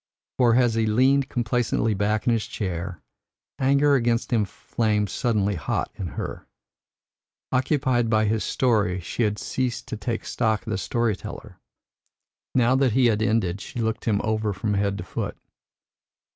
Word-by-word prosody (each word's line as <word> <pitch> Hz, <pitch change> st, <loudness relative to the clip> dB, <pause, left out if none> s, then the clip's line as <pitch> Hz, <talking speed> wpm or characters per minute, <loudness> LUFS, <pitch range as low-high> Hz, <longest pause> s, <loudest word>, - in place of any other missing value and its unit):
For 120 Hz, -2 st, +5 dB
as 120 Hz, -2 st, +3 dB
he 110 Hz, -1 st, +1 dB
leaned 130 Hz, +5 st, +3 dB
complacently 120 Hz, -2 st, 0 dB
back 105 Hz, +2 st, 0 dB
in 120 Hz, -, +3 dB
his 115 Hz, -2 st, 0 dB
seat, 90 Hz, -2 st, -4 dB, 0.6 s
anger 140 Hz, +2 st, +4 dB
against 120 Hz, -2 st, +1 dB
him 110 Hz, -3 st, +3 dB
flamed 105 Hz, -1 st, -1 dB
suddenly 105 Hz, -5 st, +1 dB
hot 80 Hz, -8 st, -2 dB
in 95 Hz, -, -5 dB
her. -, -, -5 dB, 1.0 s
Occupied 130 Hz, -3 st, +1 dB
by 110 Hz, -1 st, +3 dB
his 110 Hz, +1 st, 0 dB
story, 105 Hz, -8 st, +1 dB
she 90 Hz, +7 st, -4 dB
had 105 Hz, -2 st, +1 dB
ceased 125 Hz, +1 st, -3 dB
to 115 Hz, -, -4 dB
take 115 Hz, +2 st, -3 dB
stock 110 Hz, -2 st, 0 dB
of 115 Hz, -, -4 dB
the 95 Hz, -, -1 dB
story 115 Hz, +2 st, 0 dB
teller. -, -, -9 dB, 1.0 s
Now 125 Hz, 0 st, +4 dB
that 130 Hz, -4 st, +2 dB
he 130 Hz, +1 st, +4 dB
had 105 Hz, -, -2 dB
ended, 100 Hz, -4 st, +1 dB
she 140 Hz, -, -9 dB
looked 110 Hz, -1 st, -2 dB
him 105 Hz, -3 st, +1 dB
over 110 Hz, -1 st, 0 dB
from 105 Hz, +3 st, -2 dB
head 100 Hz, 0 st, 0 dB
to 90 Hz, -, -5 dB
foot. -, -, -4 dB
110 Hz, 160 wpm, -24 LUFS, 105-125 Hz, 1.0 s, For